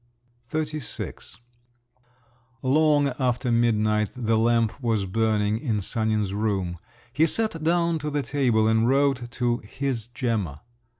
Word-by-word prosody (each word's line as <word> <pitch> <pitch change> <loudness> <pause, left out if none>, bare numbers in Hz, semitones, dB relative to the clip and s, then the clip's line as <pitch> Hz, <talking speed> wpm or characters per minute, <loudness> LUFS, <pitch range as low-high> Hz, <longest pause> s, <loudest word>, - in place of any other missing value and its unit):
XXXVI 150 - -4 1.3
Long 145 +1 +3
after 125 -1 0
midnight 110 -3 +2
the 115 -2 +1
lamp 115 +2 +1
was 110 -5 0
burning 105 +1 +1
in 115 -5 -1
Sanin's 105 -1 -1
room. 95 -5 -1 0.3
He 155 +4 +3
sat 215 -4 0
down 170 0 +2
to 150 0 -3
the 145 -1 -1
table 120 -7 +2
and 110 +1 +3
wrote 135 -3 +2
to 120 -1 0
"his 120 0 -4
Gemma." 110 - -2
120 Hz, 120 wpm, -25 LUFS, 110-140 Hz, 1.3 s, Long